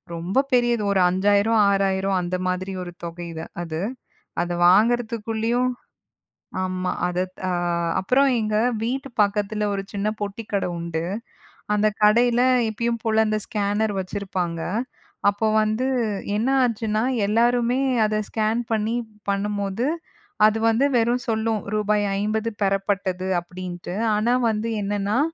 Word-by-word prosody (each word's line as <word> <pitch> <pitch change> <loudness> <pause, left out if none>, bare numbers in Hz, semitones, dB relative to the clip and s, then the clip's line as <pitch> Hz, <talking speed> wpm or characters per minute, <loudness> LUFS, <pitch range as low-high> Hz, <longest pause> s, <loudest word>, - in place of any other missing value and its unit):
ரொம்ப 175 +8 0
பெரியது 240 -3 +3
ஒரு 195 - +2
5,000 205 +4 +3
6,000 195 -1 +1
அந்த 175 +1 -2
மாதிரி 185 +1 -2
ஒரு 175 - -7
தொகைது 170 -1 -6 0.2
அது. 160 -2 -4 0.6
அதை 175 0 -2
வாங்குறதுக்குள்ளேயும் 230 +3 +2 0.9
ஆமா. 185 0 -2 0.2
அதா 180 +1 0 0.2
தா 185 - -2 0.5
அப்புறம் 265 +8 +3
எங்க 215 -1 -1 0.3
வீட்டு 265 +4 -2
பக்கத்துல 210 +1 0
ஒரு 195 - -1
சின்னப் 210 +2 -2
பொட்டிக்கடை 205 -1 -2
உண்டு. 170 -1 -3 0.7
அந்தக் 210 0 +1
கடையில 235 +3 +5 0.3
இப்பயும் 235 +1 -2
போல 220 -1 +3
அந்த 215 0 0
ஸ்கேனர் 210 0 0
வச்சிருப்பாங்க. 185 -3 -3 0.7
அப்போ 205 +2 -2 0.2
வந்து 215 +3 0 0.5
என்ன 225 +4 0
ஆச்சுன்னா, 220 -3 0 0.2
எல்லாருமே 240 +3 +2 0.3
அதை 215 0 0
ஸ்கேன் 220 +1 0
பண்ணி 220 +1 0 0.4
பண்ணும்போது, 200 +2 -1 0.6
அது 215 +1 +2
வந்து 225 +4 +3
வெறும் 240 +1 +1
சொல்லும், 220 -1 0
"ரூபாய் 210 0 +1 0.2
50 215 +2 -1
பெறப்பட்டது" 195 -1 0
அப்படின்ட்டு. 175 0 -7 0.2
ஆனா 230 +4 +2 0.2
வந்து 220 +1 -2
என்னான்னா, 205 +2 0
210 Hz, 120 wpm, -23 LUFS, 190-225 Hz, 0.9 s, கடையில